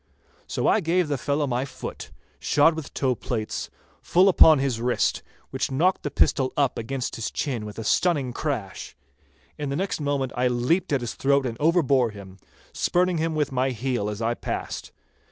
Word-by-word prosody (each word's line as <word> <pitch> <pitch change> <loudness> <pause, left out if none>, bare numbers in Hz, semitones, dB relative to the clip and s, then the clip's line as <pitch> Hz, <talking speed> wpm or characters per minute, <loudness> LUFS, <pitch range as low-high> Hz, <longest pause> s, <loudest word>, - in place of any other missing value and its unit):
So - - -2
I - - +4
gave 175 -1 +1
the 145 - +1
fellow 145 +1 0
my 125 -1 -1
foot, 135 - -7 0.3
shod 150 +3 +4
with 160 -2 -7
toe 130 -2 0
plates, 110 -1 -4 0.3
full 185 +3 +4
upon 160 -4 +7
his 135 -4 -1
wrist, 125 +1 +1 0.3
which - - -2
knocked 170 +8 +1
the 145 - -3
pistol 130 -2 +2
up 140 -3 +1
against 125 +3 -4
his 115 - -3
chin 120 -7 -3
with 105 - -9
a 115 - -4
stunning 140 - +1
crash. 115 - -4 0.6
In 145 -2 -3
the 140 - -2
next 190 +3 -2
moment 140 -3 -1
I 125 0 +2
leaped 125 +10 0
at 140 -3 +1
his 120 - -4
throat 140 0 +2
and 120 -3 -3
overbore 140 -7 +3
him, 95 -2 -12 0.3
spurning 180 -1 +1
him 160 0 -1
with 150 -2 0
my 130 0 +1
heel 120 -3 -2
as 105 +2 -4
I 115 +1 +1
passed. - - -5
135 Hz, 185 wpm, -25 LUFS, 120-155 Hz, 0.6 s, upon